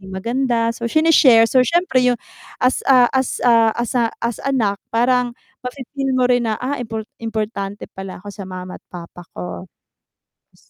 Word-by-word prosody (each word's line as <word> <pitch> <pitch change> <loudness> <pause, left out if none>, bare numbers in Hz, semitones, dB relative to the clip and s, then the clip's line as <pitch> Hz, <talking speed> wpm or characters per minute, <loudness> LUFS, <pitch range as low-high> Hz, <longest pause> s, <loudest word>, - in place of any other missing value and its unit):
maganda." 230 +5 -1
So 235 0 -4
sini-share, 285 -6 +5
so 260 - +4
siyempre 335 0 +2
yung 245 - +3 0.5
as, 255 +1 +2
ah, 250 -2 +6
as, 265 -1 -1
ah, 230 -2 +5
as 240 -1 -2 0.3
as 235 -1 -2
anak 225 -8 0
parang 245 +1 +1 0.2
mafi-feel 270 +2 -5
mo 255 - +3
rin 245 -2 +2
na, 215 - 0
"Ah, 265 +2 -3
import 225 -2 -5 0.2
importante 215 -3 -4
pala 190 -1 -8
ako 205 - -8
sa 195 -2 -9
mama't 185 0 -8
papa 175 0 -10 0.2
ko." 180 +1 -7 0.9
Tapos - - -27
235 Hz, 155 wpm, -19 LUFS, 210-255 Hz, 0.9 s, ah